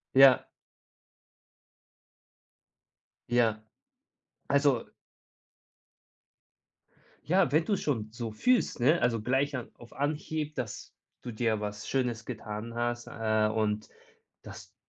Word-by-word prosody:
Ja. 135 -1 +8 2.8
Ja. 115 -3 +2 0.8
Also 140 -4 +2 2.4
Ja, 180 -5 +4
wenn 155 +3 +3
du 210 - 0
es - - -1
schon 110 -7 -2
so 115 -1 -5
fühlst, 245 - +1
ne? 150 +8 +4
Also 115 -1 +2
gleich 135 +6 0
a 125 - -4
auf 120 - -14
Anhieb, 150 +1 -2
dass 125 -7 -6 0.3
du 120 - -5
dir 110 -1 0
was 105 0 -5
Schönes 120 -4 -1
getan 110 -1 -6
hast, 120 0 -2
äh, 110 -1 +1
und 110 -1 -1 0.5
dass - - -11
120 Hz, 105 wpm, -29 LUFS, 110-140 Hz, 2.8 s, Ja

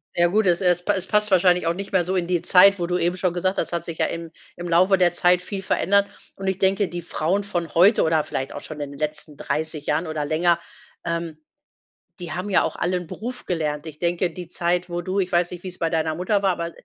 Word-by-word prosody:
Ja 175 0 +4
gut, 205 +2 +2
es 175 -1 +3
es 175 -1 +2
pa - - +1
es 190 -1 -2
passt 210 0 +2
wahrscheinlich 180 -2 +3
auch 165 - +2
nicht 200 +2 -6
mehr 185 -2 +3
so 185 +2 -2
in 180 -2 0
die 175 -2 0
Zeit, 195 +2 +6
wo 170 - -1
du 180 0 0
eben 175 +1 0
schon 185 -1 -1
gesagt 185 +2 -1
hast. - - 0
Es - - -8
hat 170 -1 -2
sich 165 -2 -6
ja - - +2
im 165 -1 -6 0.2
im 175 0 -6
Laufe 185 +3 +4
der 175 -2 +3
Zeit 180 +1 +4
viel 195 +1 -5
verändert 200 +1 +2 0.3
und 195 0 -5
ich 190 -1 0
denke, 195 +1 +2
die 175 0 -6
Frauen 175 +5 -1
von 175 -5 -4
heute 190 +6 +6
oder 160 -1 +2
vielleicht 135 - -4
auch - - -7
schon 155 -1 -9
in 145 -1 -4
den 140 - -11
letzten 150 -1 -4
30 155 -1 -3
Jahren 165 +1 0
oder 155 -2 -3
länger, 170 +3 +2 0.5
ähm, 170 -2 -3 0.8
die 175 - -6
haben 185 +3 -4
ja 190 - +3
auch - - -3
alle 180 +1 0
'n 175 -2 -7
Beruf 245 +7 -7
gelernt. 155 -3 -2
Ich 150 -1 -10
denke, 175 +1 0
die 175 0 -8
Zeit, 175 +1 -1
wo 175 0 -3
du 185 +3 -2
ich 185 -1 -1
weiß 175 0 +2
nicht 175 -1 -8
wie's 185 -1 -7
bei 165 - 0
deiner 160 -1 -1
Mutter 190 +4 0
war, 195 - +3
aber 170 -1 -4
175 Hz, 265 wpm, -23 LUFS, 165-185 Hz, 0.8 s, Zeit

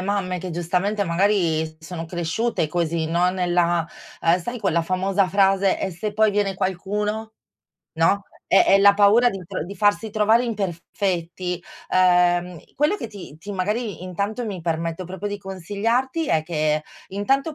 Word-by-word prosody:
mamme 185 -2 -1
che 185 +1 -6
giustamente 180 +5 0
magari 170 -3 +2
s 155 0 -14
sono 165 +1 -6
cresciute 175 +2 -1
così 165 -1 -1
no, 175 +2 +2
nella 175 -2 +1 0.3
uhm, 170 +2 +3
sai 240 +7 -5
quella 165 +3 +1
famosa 190 +2 +1
frase: 195 0 +3
"e 190 - -1
se 205 +5 -4
poi 215 0 +3
viene 200 -1 0
qualcuno", 210 +4 -2 0.6
no? 165 +5 +2 0.3
È 195 - +6
è 195 - +5
la 200 0 +7
paura 210 +4 +5
di 195 -4 -5
tro 155 - -4
di 200 +3 -8
farsi 205 +3 +2
trovare 220 +3 +3
imperfetti. 180 -3 -3 0.3
Ehm, 180 -1 +3 0.2
quello 300 +7 +2
che 230 - -6
ti 190 -8 -11
ti 205 - -9
magari 205 0 -2
intanto 200 +6 -3
mi 190 -4 -5
permetto 165 +1 -2
proprio 190 +3 -5
di 205 - -3
consigliarti 215 - -1
è 155 -1 +2
che 155 -2 0 0.2
intanto 270 - 0
190 Hz, 155 wpm, -23 LUFS, 170-205 Hz, 0.6 s, la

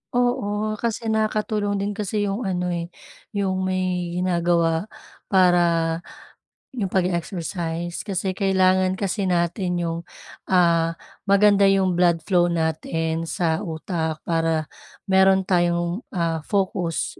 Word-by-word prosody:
Oo, 245 -2 +1 0.4
kasi 225 -1 -1
nakakatulong 215 -1 0
din 205 - -1
kasi 205 0 -2
yung 200 +2 -2
ano 180 -1 -1
eh, 170 -1 -3 0.5
yung 190 -2 0
may 180 -2 -1
ginagawa 170 0 +1 0.4
para 180 -2 +4 1.1
yung 220 -7 -2
pag-exercise. 175 -1 -2
Kasi 190 -1 -1
kailangan 185 -1 +2
kasi 195 0 -2
natin 180 +1 0
yung, 165 0 -2 0.5
ah, 170 -2 +3 0.3
maganda 200 0 +5
yung 195 -1 +3
blood 170 -2 +3
flow 175 -2 +3
natin 160 0 -1
sa 160 0 0
utak, 160 -3 -4
para 165 -1 0 0.5
meron 190 0 +5
tayong, 175 +2 0
ah, 165 -2 0
focus. 185 -4 -1
180 Hz, 110 wpm, -23 LUFS, 170-195 Hz, 1.1 s, maganda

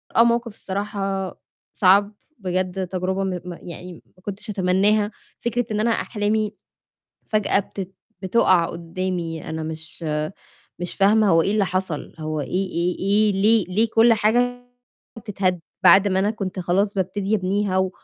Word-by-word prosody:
آه، 230 - +7
موقِف 235 -2 +1
الصراحة 195 -1 -3 0.4
صعب 200 +2 +4 0.3
بجد 185 0 -2
تجربة 190 +1 -2
م 190 - -1 0.2
م 180 - -5
يعني 175 0 -9
ما 185 - -27
كنتش 205 +2 -5
أتمناها. 205 +2 +2 0.3
فكرة 240 +1 -1
إن 210 - 0
أنا 230 +2 +2
أحلامي 215 -1 -1 0.7
فجأة 215 -2 +2
بتت 195 -1 -8 0.3
بتُقع 185 -3 +4
قُدّامي 170 -1 -4
أنا 160 0 -4
مش 160 +2 -7 0.8
مش 175 - -3
فاهمة 210 +1 +4
هو 165 -1 +5
إيه 200 - 0
اللي 210 -2 +2
حصل؟ 185 -4 -3
هو 155 -1 -3
إيه - - -5 0.2
إيه 175 +1 -1
إيه 205 +2 +3
ليه 210 +2 +3
ليه 215 +5 +1
كل 230 +1 +6
حاجة 245 +3 +1 0.5
بتتهد 190 -5 -1 0.2
بعد 190 +3 +7
ما 190 -1 +1
أنا 205 +2 +2
كنت 195 -4 -5
خلاص 195 +4 +1
بابتدي 195 +2 -1
أبنيها 195 0 0
و 190 0 +1
195 Hz, 150 wpm, -22 LUFS, 180-210 Hz, 0.8 s, آه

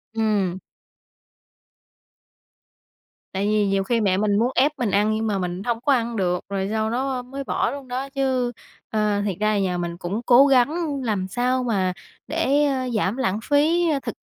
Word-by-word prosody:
Ừm. 205 -5 0 2.7
Tại 195 +1 -1
vì 210 -1 +2
nhiều 195 0 +1
khi 230 +3 0
mẹ 190 -3 +2
mình 205 0 +1
muốn 240 +3 +1
ép 285 +4 +4
mình 235 -5 0
ăn 210 +2 +2
nhưng 220 +1 -1
mà 205 -2 0
mình 180 0 -3
hông 235 0 -2
có 280 - +3
ăn 235 -2 0
được, 180 -3 0
rồi 195 -1 -2
sau 220 0 0
đó 260 +1 -1
mới 270 +3 -7
bỏ - - -1
luôn 280 -1 -8
đó 260 +2 -4
chứ. 260 -3 0 0.4
Ờ, 210 -2 0
thiệt 195 -4 -2
ra 215 - +1
là 205 - +1
nhà 185 -2 0
mình 170 -1 -4
cũng 190 +5 -3
cố 260 +3 +7
gắng 280 +3 +2
làm 200 -5 -1
sao 250 +4 0
mà 195 -6 0 0.3
để, 295 -1 +1
ơ, 260 -3 -1
giảm 210 +2 0
lãng 205 -6 0
phí, 320 +5 +2
a, 295 -3 +1
thực - - -6
225 Hz, 190 wpm, -23 LUFS, 200-265 Hz, 2.7 s, cố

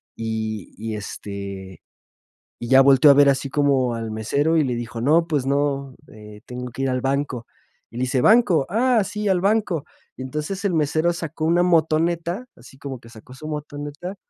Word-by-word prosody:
Y 110 -2 -4
y, 110 0 -5
este, 100 -3 -7 0.8
y 120 - -6
ya 135 0 +7
volteó 135 +1 +6
a 140 - +8
ver 140 -1 +6
así 135 0 0
como 135 -4 +1
al 115 -1 -5
mesero 140 +9 0
y 155 - +4
le 125 -2 -1
dijo: 115 -1 -5
"No, 160 +6 +3
pues 145 -5 -1
no, 140 -1 -1 0.2
eh, 105 -1 -13
tengo 125 0 -6
que 135 - -4
ir 135 - +1
al 130 0 -1
banco". 135 -3 -2 0.4
Y 115 - -11
le - - -3
dice: 130 0 0
"Banco, 205 - +4
ah, 230 +1 +2
sí, 210 +2 -4
al 185 -2 +2
banco". 200 -6 0 0.3
Y - - -9
entonces 150 +9 -4
el 180 - +1
mesero 155 +3 +1
sacó 165 -1 -4
una 175 +2 +3
motoneta, 170 +4 +1
así 125 +2 -16
como 135 -2 -7
que 115 - -16
sacó 115 +2 -14
su 155 +4 -9
motoneta 150 +4 -6
140 Hz, 190 wpm, -22 LUFS, 120-165 Hz, 0.8 s, a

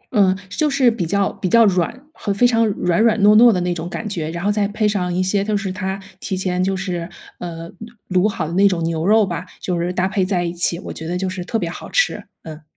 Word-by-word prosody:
嗯， 190 -2 +4
就 300 - 0
是 265 -4 +3
比 180 -7 -3
较 200 +2 +1
比 185 - -3
较 230 0 +6
软 200 - 0
和 200 - -4
非 200 +5 +3
常 230 -2 +3
软 180 -2 0
软 225 -1 +3
糯 210 +1 +7
糯 235 +1 +8
的 185 - 0
那 175 0 0
种 170 +1 -5
感 215 - -5
觉， 165 -6 -3
然 170 +3 -5
后 205 - +3
再 205 -1 +1
配 210 +1 0
上 185 -4 -1
一 185 +1 0
些 195 +1 +1
就 210 0 0
是 195 -2 -3
他 190 0 -4 0.2
提 190 - -3
前 185 -1 -1
就 190 0 0
是， 175 -3 -4 0.3
呃， 165 -1 -6 0.4
卤 180 -1 +3
卤 210 - +3
好 160 -6 -3
的 165 - -5
那 200 +2 +5
种 175 -4 0
牛 165 0 -1
肉 215 0 +5
吧， 175 0 -4
就 180 -2 -2
是 175 +1 -1
搭 185 +1 0
配 195 -1 0
在 185 -2 0
一 170 0 -3
起， 170 -1 0
我 - - -7
觉 160 - -7
得 180 +1 -2
就 190 0 -2
是 185 -1 -4
特 225 - -2
别 175 -6 -2
好 170 - -8
吃， - - +1 0.2
嗯。 155 -1 -9
190 Hz, 285 characters per minute, -20 LUFS, 175-210 Hz, 0.4 s, 糯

